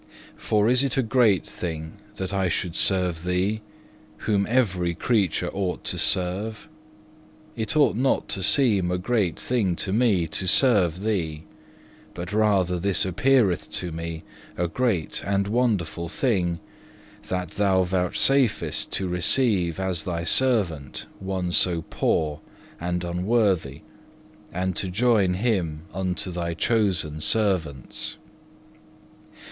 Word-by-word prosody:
For 105 0 +1
is 125 +2 +4
it 135 -2 -1
a 135 - +3
great 110 -5 +3
thing 80 -2 -6 0.2
that 95 +1 -4
I 95 -2 +1
should 85 0 -2
serve 90 -4 +2
Thee, 95 +4 0 0.6
whom 100 -2 +1
every 95 -9 +1
creature 100 -4 0
ought 95 -2 -3
to - - -1
serve? 95 +4 -1 0.9
It 110 +2 -2
ought 145 - +4
not 130 +4 +1
to 95 - -1
seem 100 -6 +3
a 90 - 0
great 95 -3 -1
thing 105 -8 0
to 95 +2 -2
me 105 -7 +2
to 90 +4 -3
serve 95 - +4
Thee; 85 -8 -2 0.7
but 90 +3 -6
rather 100 -5 +2
this 100 +1 +1
appeareth 105 0 +2
to 90 - -3
me 80 0 -6 0.3
a 85 - 0
great 110 -5 -1
and 100 0 0
wonderful 100 -8 -1
thing, 90 - 0 0.7
that 90 -1 -3
Thou 95 -2 +2
vouchsafest 95 +8 +1
to 95 - -2
receive 90 -1 +2
as 95 -3 -2
Thy 85 -2 -3
servant 90 - 0
one 95 -2 -3
so 85 -2 +3
poor 75 -2 0 0.4
and 90 +1 -2
unworthy, 90 - 0 0.7
and 95 0 -2
to 95 - -1
join 100 -1 +2
him 90 -8 -1
unto 95 0 -2
Thy 85 -1 -3
chosen 85 -6 0
servants. 90 - 0
95 Hz, 125 wpm, -24 LUFS, 85-110 Hz, 0.9 s, is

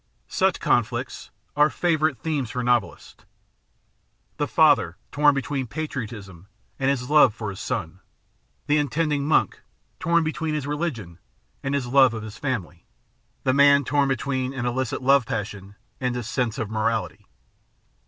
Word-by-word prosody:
Such - - +1
conflicts - - -1 0.3
are 150 +1 +5
favourite 155 -5 +1
themes 145 -7 -2
for 125 +2 -3
novelists: 120 -7 -1 1.1
the 145 0 -1
father 140 - +3
torn 145 0 +4
between 135 -1 -2
patriotism 110 - -6 0.3
and 135 0 +1
his 130 -1 -2
love 140 -7 +6
for 110 -3 -4
his 95 - -9
son; 85 +2 -4 0.7
the 150 +1 +2
intending 145 0 0
monk 155 - +2 0.4
torn 170 0 +2
between 155 0 -2
his 150 -3 -3
religion 140 - -4 0.4
and 135 +1 -2
his 140 -3 -1
love 130 -1 +4
of 110 - -5
his 110 0 -9
family; 95 - -4 0.6
the 130 - +2
man 140 0 +6
torn 145 0 +2
between 130 0 -2
an 120 -2 -3
illicit 130 +1 -2
love 135 -2 +4
passion 100 -2 -5 0.2
and 125 -1 -1
his 120 -3 -4
sense 120 -2 -1
of 110 - -2
morality. 110 -1 -2
130 Hz, 145 wpm, -24 LUFS, 110-145 Hz, 1.1 s, love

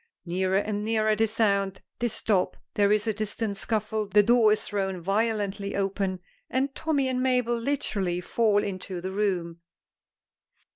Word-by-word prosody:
Nearer 185 +2 +1
and 205 +1 -1
nearer 215 -1 +2
they 225 +1 +2
sound; 200 -3 +1 0.2
they 240 - +1
stop, 210 -4 0 0.2
there 205 -1 +3
is 210 0 +3
a 220 - +1
distant 215 0 -3
scuffle, 215 0 -2
the 205 +1 +5
door 230 -1 +5
is 215 - +1
thrown 195 -3 -2
violently 200 +1 -1
open, 195 -2 -1 0.3
and 265 +2 0
Tommy 290 -4 0
and 255 -1 -1
Mabel 250 -2 +2
literally 225 -8 -1
fall 205 +2 +2
into 185 -2 -5
the 185 +2 -4
room. 180 -4 -1
210 Hz, 150 wpm, -27 LUFS, 195-225 Hz, 0.3 s, the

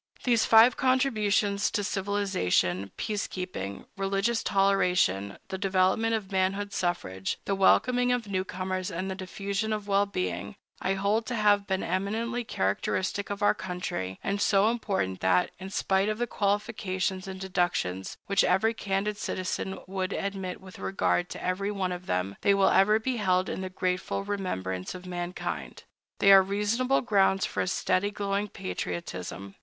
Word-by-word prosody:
These 235 -3 +3
five 230 +2 +7
contributions 215 -6 +2
to 205 - -1
civilization—peace 195 - 0
keeping, 100 - -5
religious 195 +4 0
toleration, 180 - +2
the 190 - -4
development 195 +4 +2
of 205 -3 -5
manhood 195 +2 0
suffrage, 95 - -2
the 200 - 0
welcoming 245 +6 +4
of 245 -2 0
newcomers, 185 -1 -2
and 185 +2 -3
the - - -3
diffusion 200 +3 -3
of 210 -1 -3
wellbeing—I 190 - -2
hold 205 +3 0
to 245 - -2
have 205 -2 +3
been 190 -1 -1
eminently 225 +6 -1
characteristic 185 - -1
of 205 0 -3
our 205 - +5
country, 180 - -4
and 200 +1 -1
so 205 +1 +4
important 195 - -2
that, 95 - +2
in 190 +1 -7
spite 195 +1 +1
of 215 - -1
the 240 - 0
qualifications 200 -3 -1
and 190 0 -6
deductions 175 - -1
which 200 0 +3
every 190 +5 +3
candid 205 0 -2
citizen 190 0 -3
would 190 0 -3
admit 195 -2 -3
with 190 -1 -13
regard 180 -2 0
to - - -7
every 185 +2 -1
one 195 -3 -1
of 180 0 -6
them, 95 +2 -1
they 200 - +4
will 195 -1 +4
ever 210 +3 +5
be 245 +3 -2
held 185 -3 +1
in - - -3
the 185 - -4
grateful 185 +1 -2
remembrance 95 - -3
of 180 0 -9
mankind. 175 - -5 0.3
They 195 - +6
are 195 0 +10
reasonable 210 +7 +1
grounds 195 -4 +3
for - - -2
a - - -1
steady, 185 +1 +1
glowing 200 0 -2
patriotism. 90 - -5
195 Hz, 150 wpm, -28 LUFS, 180-205 Hz, 0.3 s, are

